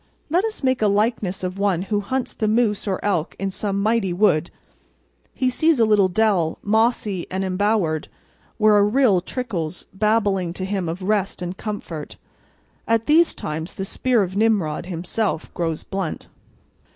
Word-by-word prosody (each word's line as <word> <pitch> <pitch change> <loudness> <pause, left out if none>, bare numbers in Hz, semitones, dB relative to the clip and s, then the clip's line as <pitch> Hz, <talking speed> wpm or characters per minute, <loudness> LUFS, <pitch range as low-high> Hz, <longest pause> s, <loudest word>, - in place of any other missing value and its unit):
Let 355 +4 +3
us 440 -8 -4
make 260 -2 +1
a 215 - +4
likeness 205 -2 0
of 185 +1 -3
one 195 -3 +1
who 205 +1 -1
hunts 255 +5 -3
the 215 - -1
moose 215 -2 +1
or 190 -2 -1
elk 175 -6 0
in 195 0 -2
some 200 0 -2
mighty 215 -3 +1
wood. 175 -4 +2 0.9
He 255 - 0
sees 310 +3 +2
a 225 - +5
little 210 -3 +4
dell, 185 -4 +1
mossy 215 -3 +1
and 190 +1 -2
embowered, 190 -4 0 0.5
where 215 -1 +5
a 205 - +5
rill 210 -3 +3
trickles, 185 -7 -4
babbling 200 -4 +1
to 185 +1 -4
him 190 -3 -2
of 175 +3 -5
rest 195 -2 0
and 180 +1 -4
comfort. 180 -8 -6 0.7
At 225 0 +2
these 320 +4 +4
times 160 +3 -5
the 195 - -4
spear 240 +2 +1
of 185 0 -5
Nimrod 200 -8 +1
himself 180 +1 -2
grows 165 -2 -2
blunt. 190 -4 -4
200 Hz, 165 wpm, -22 LUFS, 180-220 Hz, 0.9 s, a